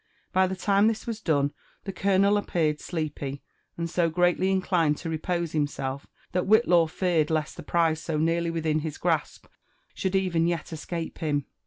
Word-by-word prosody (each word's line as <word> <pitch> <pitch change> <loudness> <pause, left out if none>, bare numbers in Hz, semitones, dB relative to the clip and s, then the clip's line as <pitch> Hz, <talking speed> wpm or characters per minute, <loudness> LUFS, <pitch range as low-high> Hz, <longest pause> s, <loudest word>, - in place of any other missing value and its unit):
By 185 0 +4
tlie 190 0 -5
time 200 +2 +3
this 225 -1 -1
was 225 -2 -4
done, 145 -5 +1 0.3
the 195 - -5
colonel 195 +2 +3
appeared 160 -7 0
sleepy, 145 -4 -4 0.3
and 170 0 -2
so 170 0 +1
greatly 175 +2 +2
inclined 180 -5 +2
to 165 - -5
repose 170 +1 -2
himself 140 -2 -2 0.2
that 180 0 -1
Whillaw 185 -6 +5
feared 165 -3 +1
lest 155 -1 -1
the - - -8
prize 165 -2 +1
so 160 -2 -2
nearly 165 +2 +1
wilhin 160 -2 0
his 155 -1 -5
grasp - - -1 0.5
should 190 0 -2
even 175 -3 +2
yet 170 -1 -2
escape 165 +1 -5
him. 145 -3 -1
170 Hz, 170 wpm, -26 LUFS, 155-185 Hz, 0.5 s, Whillaw